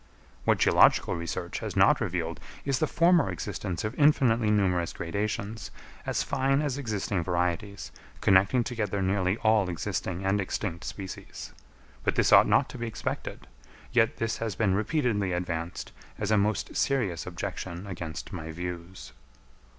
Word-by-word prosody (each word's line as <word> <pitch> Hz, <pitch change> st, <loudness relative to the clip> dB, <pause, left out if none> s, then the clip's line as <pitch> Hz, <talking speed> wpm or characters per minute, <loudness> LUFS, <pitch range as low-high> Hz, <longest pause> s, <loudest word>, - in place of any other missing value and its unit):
What -, -, +4 dB
geological -, -, +4 dB
research 85 Hz, +1 st, -4 dB
has -, -, -5 dB
not -, -, +5 dB
revealed, 85 Hz, -2 st, -2 dB, 0.3 s
is 135 Hz, -2 st, +1 dB
the 155 Hz, -, +2 dB
former 170 Hz, -, +4 dB
existence 90 Hz, 0 st, -4 dB
of 105 Hz, +2 st, -2 dB
infinitely 120 Hz, -7 st, +4 dB
numerous 90 Hz, -5 st, +1 dB
gradations, 105 Hz, +4 st, -3 dB, 0.4 s
as -, -, 0 dB
fine 135 Hz, 0 st, +1 dB
as 145 Hz, -2 st, -2 dB
existing 105 Hz, -7 st, -2 dB
varieties, 90 Hz, +3 st, -2 dB, 0.3 s
connecting 100 Hz, +6 st, +4 dB
together 105 Hz, -5 st, -2 dB
nearly 95 Hz, +1 st, +1 dB
all 110 Hz, -4 st, +3 dB
existing 90 Hz, +1 st, -3 dB
and 100 Hz, +1 st, +2 dB
extinct 90 Hz, -2 st, -3 dB
species. 95 Hz, -3 st, -7 dB, 0.5 s
But -, -, +1 dB
this -, -, +3 dB
ought -, -, +8 dB
not -, -, +3 dB
to -, -, -8 dB
be 120 Hz, -, -3 dB
expected; 115 Hz, -, -5 dB, 0.5 s
yet 115 Hz, -2 st, +3 dB
this 115 Hz, 0 st, -1 dB
has 110 Hz, -4 st, -3 dB
been 100 Hz, -4 st, +2 dB
repeatedly 105 Hz, -, 0 dB
advanced 85 Hz, -1 st, -3 dB, 0.3 s
as 105 Hz, 0 st, -2 dB
a -, -, +5 dB
most 105 Hz, +1 st, 0 dB
serious 105 Hz, -13 st, 0 dB
objection 90 Hz, 0 st, -5 dB
against 85 Hz, -4 st, -6 dB
my 80 Hz, -3 st, -5 dB
views. 90 Hz, +2 st, -7 dB
100 Hz, 145 wpm, -28 LUFS, 90-115 Hz, 0.5 s, ought